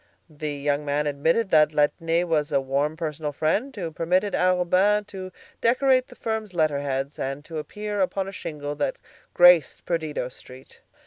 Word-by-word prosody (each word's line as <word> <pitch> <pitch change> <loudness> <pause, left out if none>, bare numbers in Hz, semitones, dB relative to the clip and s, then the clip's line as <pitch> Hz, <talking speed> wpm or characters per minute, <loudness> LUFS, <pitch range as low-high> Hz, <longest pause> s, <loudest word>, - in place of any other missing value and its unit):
The 150 0 -4
young 145 +1 -1
man 145 +1 0
admitted 160 +9 +1
that 155 -1 +5
Laitner 165 +3 +1
was 155 -3 0
a 140 - +3
warm 140 +3 -1
personal 155 -2 -3
friend, 205 - -1
who 175 -6 -4
permitted 180 +5 0
Arobin's 180 -1 +1
name 205 +3 +4
to 190 -2 -8 0.3
decorate 255 +2 +3
the - - -14
firm's 220 -4 -4
letterheads 140 -3 -1
and 135 +2 -4
to 160 -1 -5
appear 210 +5 -4
upon 190 +1 -1
a - - -5
shingle 150 -6 -5
that 145 - -1 0.4
graced 175 -2 +5
Perdido 155 -6 -2
Street. 130 +1 -15
160 Hz, 165 wpm, -25 LUFS, 145-190 Hz, 0.4 s, that